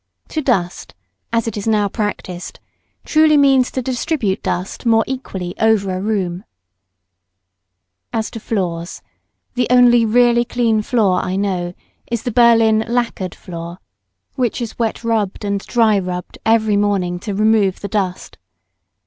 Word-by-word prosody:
To 310 - -2
dust, 190 - -1 0.4
as 230 0 0
it 225 - -3
is 205 +1 -4
now 210 -2 +2
practised, 200 -4 -5 0.5
truly 310 -1 +4
means 270 -3 +4
to 260 - -4
distribute 245 - -1
dust 180 +2 -3
more 225 -2 +3
equally 195 -9 -5
over 220 -3 +2
a 185 - -3
room. 190 -4 -2 1.6
[Sidenote: - - -57
Floors.] - - -43
As 220 -1 -2
to 225 - -7
floors, 175 -6 -3 0.5
the 245 -1 0
only 245 -1 +6
really 240 +1 +4
clean 235 -3 +1
floor 210 -5 +1
I 185 - -3
know 185 -3 -2 0.4
is 235 -2 -2
the 245 - -2
Berlin 225 -2 +4
lackered 230 -6 -2
floor, 170 -1 -8 0.6
which 250 -2 -1
is 235 -1 -6
wet 230 0 -1
rubbed 220 -3 -1
and 200 0 -1
dry 220 -4 +3
rubbed 180 -1 -6
every 220 -2 +3
morning 195 -4 0
to 205 +1 -5
remove 215 -2 +2
the 200 - -4
dust. 190 -3 -3
215 Hz, 150 wpm, -18 LUFS, 190-235 Hz, 1.6 s, only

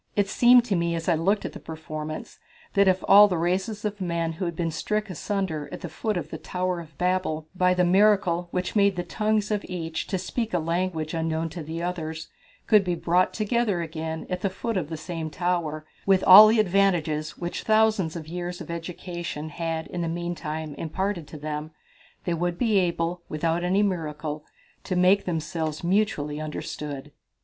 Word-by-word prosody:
It 205 -1 +2
seemed 245 +3 +6
to 210 -5 0
me, 170 -1 0
as 165 0 -4
I 175 - +4
looked 190 +6 +1
at - - -5
the - - -8
performance, 155 -1 -7 0.3
that 200 0 +4
if 185 0 +3
all 205 +1 +9
the 180 -4 -1
races 190 +6 -1
of 205 -1 -3
men, 170 -2 -1
who 170 +3 -4
had 170 -1 -3
been 165 0 -1
stricken 210 +5 -2
asunder 180 -4 -3
at - - -7
the 175 - -5
foot 210 +6 -2
of 160 -2 -5
the - - -5
Tower 180 -1 -2
of 155 -4 -12
Babel 180 -4 0
by 180 0 +3
the 180 - +3
miracle 185 -2 +3
which 180 +3 -3
made 200 -2 +4
the 175 - -2
tongues 215 +1 0
of 210 -1 0
each 165 -3 -4
to 190 - -1
speak 215 +3 -3
a - - +4
language 165 -1 -1
unknown 165 0 -1
to 170 +2 -7
the 160 +2 -5
others, 160 -3 -4 0.4
could 210 -2 +5
be 180 -2 -1
brought 175 +2 +2
together 215 -4 0
again 160 0 -5
at 180 -1 -3
the 195 - +1
foot 225 +4 -4
of 170 -6 -1
the 160 - -4
same 160 0 -5
tower, 165 -2 -2 0.2
with 190 -1 +4
all 205 +3 +11
the 220 +1 +3
advantages 175 -6 +1
which 175 0 -4
thousands 215 -6 +2
of 160 -2 -6
years 175 +1 -5
of - - -7
education 170 -2 -5
had 165 0 -3
in 175 - -5
the 165 - -1
meantime 160 -3 -4
imparted 180 0 -2
to 155 - -9
them, 150 +1 -4 0.5
they 175 - -1
would 175 +1 -1
be 220 -3 +3
able, 175 -1 -1
without 165 +2 -1
any 190 +3 +2
miracle, 155 -5 -3 0.4
to 185 - -2
make 185 +3 +4
themselves 160 -2 -3
mutually 170 -6 0
understood. 150 -2 -6
175 Hz, 190 wpm, -26 LUFS, 160-190 Hz, 0.5 s, all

